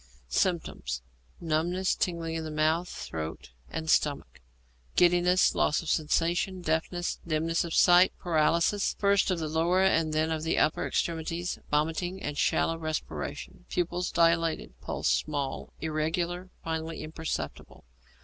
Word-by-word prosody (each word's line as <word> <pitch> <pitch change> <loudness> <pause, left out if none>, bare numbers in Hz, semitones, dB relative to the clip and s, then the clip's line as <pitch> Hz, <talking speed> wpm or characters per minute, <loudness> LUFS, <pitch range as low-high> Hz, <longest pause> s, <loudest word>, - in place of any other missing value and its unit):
Symptoms. 60 - -1 0.4
Numbness 170 +3 0
and - - -9
tingling 170 -2 -1
in 160 -1 -4
mouth, 160 +3 +1
throat, 80 -5 -6 0.2
and 160 0 -5
stomach, 145 - +1 0.5
giddiness, 180 +1 +4
loss 150 - +1
of 160 - -5
sensation, 170 +4 0
deafness, 170 +2 -1
dimness 165 +1 +1
of 170 -2 -4
sight, 180 +1 +6
paralysis, 170 +4 +2
first 200 -1 +3
of 185 - +1
the 160 -1 -2
lower 170 +4 +2
and 165 -5 +3
then 155 +1 +1
of 160 -1 -1
the 160 +1 0
upper 155 - +2
extremities, 170 +1 -2
vomiting, 165 +5 0
and 150 -5 -4
shallow 165 0 +1
respiration. 155 - -5
Pupils 180 +1 -1
dilated. 165 -1 +2
Pulse - - -3
small, 135 - -1
irregular, 170 +3 -2
finally 160 0 -3
imperceptible. 155 - -5
165 Hz, 130 wpm, -29 LUFS, 155-175 Hz, 0.5 s, sight